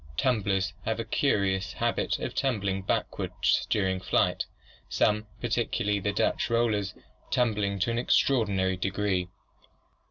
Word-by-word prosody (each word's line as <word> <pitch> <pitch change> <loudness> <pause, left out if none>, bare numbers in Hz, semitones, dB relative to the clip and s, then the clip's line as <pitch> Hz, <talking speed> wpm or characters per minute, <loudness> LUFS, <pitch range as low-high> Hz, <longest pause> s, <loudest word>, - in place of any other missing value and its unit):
Tumblers 100 -7 +1
have 110 +1 -1
a - - -1
curious 100 -6 +1
habit - - 0
of - - -4
tumbling 100 -8 0
backward 95 - -2 0.4
during 95 -3 +1
flight, - - +1 0.4
some, 105 0 +1
particularly 105 0 0
the 100 +1 -1
Dutch - - 0
Rollers, 110 -4 +1 0.3
tumbling 105 -5 +1
to 115 - +2
an 115 - 0
extraordinary 100 -8 +2
degree. 95 -1 -1
100 Hz, 120 wpm, -28 LUFS, 95-115 Hz, 0.4 s, to